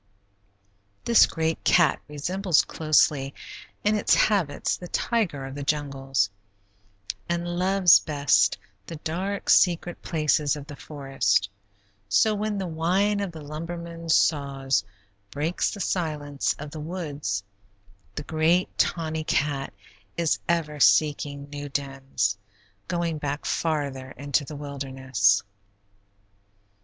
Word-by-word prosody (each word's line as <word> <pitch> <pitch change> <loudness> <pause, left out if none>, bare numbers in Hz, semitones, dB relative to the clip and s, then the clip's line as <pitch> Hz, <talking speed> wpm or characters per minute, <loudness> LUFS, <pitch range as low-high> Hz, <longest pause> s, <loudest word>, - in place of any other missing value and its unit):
This 235 -1 +6
great 160 0 -2
cat 175 -2 +4
resembles 175 +4 +1
closely 150 -3 +2 0.5
in 210 - +3
its 210 - +3
habits 185 -9 +1
the 180 - -9
tiger 175 - -1
of 135 - -7
the 145 - -6
jungles, 135 -6 0 1.0
and 170 0 -1
loves 180 +1 +5
best 135 -10 +2 0.3
the 165 - -6
dark, 180 +6 -3
secret 175 -1 +3
places 150 -3 +1
of 145 -2 -8
the 145 -1 -9
forest; 135 -10 -1 0.6
so, 215 - +4
when 210 0 -2
the 195 - -2
whine 185 +5 +1
of 200 -3 -2
the 160 -2 -10
lumbermen's 165 +2 -3
saws 135 -7 +1 0.5
breaks 155 - -1
the 205 - -7
silence 150 -7 -1
of 150 0 -8
the 155 - -7
woods, 150 - -4 0.7
the 145 - -4
great 160 +4 +1
tawny 160 -2 0
cat 145 -3 -1 0.5
is 165 -2 +1
ever 155 -3 0
seeking 145 -1 +3
new 145 0 -6
dens, 135 -7 -2 0.5
going 170 -3 -1
back 145 0 -3
farther 140 -5 -2
into 145 +2 0
the 150 - -8
wilderness. 130 -7 0
150 Hz, 115 wpm, -25 LUFS, 140-170 Hz, 1.0 s, This